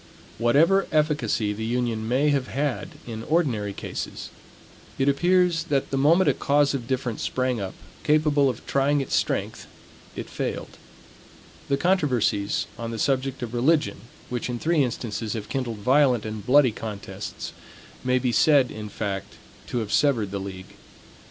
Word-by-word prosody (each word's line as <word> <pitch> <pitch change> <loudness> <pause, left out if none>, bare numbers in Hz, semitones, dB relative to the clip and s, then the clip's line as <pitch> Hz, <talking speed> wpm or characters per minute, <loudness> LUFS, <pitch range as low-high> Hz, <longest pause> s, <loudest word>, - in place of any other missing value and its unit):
Whatever 160 +12 +4
efficacy 145 -9 +1
the 110 +2 -5
union 115 -1 -1
may 135 +5 +2
have 135 -2 0
had 140 -1 -2 0.2
in 110 -2 -6
ordinary 120 -8 0
cases, - - -6 0.7
it 135 - +1
appears 175 +3 +3
that 140 -5 -1
the - - 0
moment 165 +7 +4
a - - +5
cause 145 0 +2
of 125 -4 -4
difference 125 -4 -2
sprang 125 -3 -1
up, 95 -1 -5 0.3
capable 150 -2 +3
of 120 -2 -6
trying 140 +1 +2
its 135 - -3
strength, - - -1 0.5
it - - -5
failed. - - -5 0.9
The 140 - +2
controversies 130 - +1
on 115 0 -4
the 115 - -4
subject 135 +2 0
of 120 -1 -5
religion, 150 +6 +2 0.3
which 125 0 -3
in 120 - -2
three 160 +4 +2
instances 115 -3 -3
have 105 -2 -5
kindled 120 -5 -2
violent 125 +1 +3
and 110 -1 -5
bloody 130 +2 +5
contests, 105 -2 -7 0.5
may 125 0 +2
be 125 -1 0
said, 140 0 +4
in 105 -1 -7
fact, 100 -2 -4 0.3
to - - -3
have 105 -2 -4
severed 115 -9 +2
the 100 - -3
league. 95 -1 -8
125 Hz, 155 wpm, -25 LUFS, 110-145 Hz, 0.9 s, a